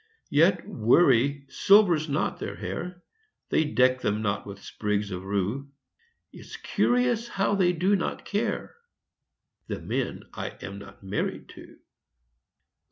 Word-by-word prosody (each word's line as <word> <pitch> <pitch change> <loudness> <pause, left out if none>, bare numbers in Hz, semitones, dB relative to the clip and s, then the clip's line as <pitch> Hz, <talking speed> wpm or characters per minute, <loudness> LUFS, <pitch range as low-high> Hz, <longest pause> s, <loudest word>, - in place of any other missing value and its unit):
Yet 170 +4 +3
worry 135 +3 +3
silvers 175 -1 +4
not 145 +2 -1
their - - -5
hair; 180 0 -6 0.5
They 160 - +2
deck 130 -3 +2
them 105 0 0
not 100 -1 -2
with 100 -1 -8
sprigs 105 -1 -2
of 90 0 -5
rue. 100 +8 -2 0.6
It's - - -10
curious 245 -2 +1
how 200 -2 0
they 185 -3 +3
do 180 +4 +2
not 180 - -3
care 210 - -2 0.9
The - - -4
men - - -3
I - - -6
am 100 +1 -7
not 100 0 -13
married 95 +1 -3
to. - - -13
140 Hz, 130 wpm, -27 LUFS, -, 0.9 s, silvers